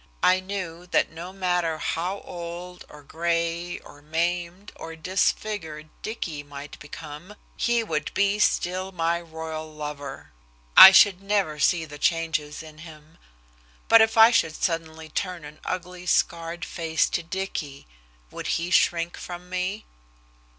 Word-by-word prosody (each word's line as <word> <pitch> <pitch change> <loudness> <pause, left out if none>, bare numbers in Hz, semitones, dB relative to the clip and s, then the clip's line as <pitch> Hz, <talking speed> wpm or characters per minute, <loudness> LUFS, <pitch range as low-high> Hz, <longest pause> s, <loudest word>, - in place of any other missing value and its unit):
I 185 0 +5
knew 185 -3 -6
that - - +1
no 170 +3 -8
matter 180 -4 0
how 180 +5 -2
old 175 +1 -8
or 150 -1 -13
gray 170 +2 -1
or 145 - -15
maimed 175 +5 -2
or 165 0 -8
disfigured 160 -2 -2
Dicky 170 -9 -4
might 145 0 -10
become 150 +6 -10 0.2
he 235 -1 +1
would 155 -8 -3
be 200 +1 +2
still 185 -1 +1
my 170 -1 0
royal 160 -1 -7
lover. 150 -2 -7 0.4
I 190 - +13
should 190 -1 +6
never 195 -7 0
see 165 +3 +2
the 145 -1 -11
changes 160 -2 0
in 155 -1 -13
him. 155 0 -14 0.7
But 230 - +8
if 220 0 +2
I 225 +1 +9
should 165 -9 +2
suddenly 160 -2 -3
turn 175 0 -4
an 150 +1 -12
ugly 180 0 -5
scarred 170 0 0
face 165 -2 0
to - - -1
Dicky 170 -5 -5 0.5
would - - -6
he 170 +2 -4
shrink 170 -1 +2
from 180 0 -9
me? 185 +4 -2
170 Hz, 140 wpm, -25 LUFS, 155-185 Hz, 0.7 s, I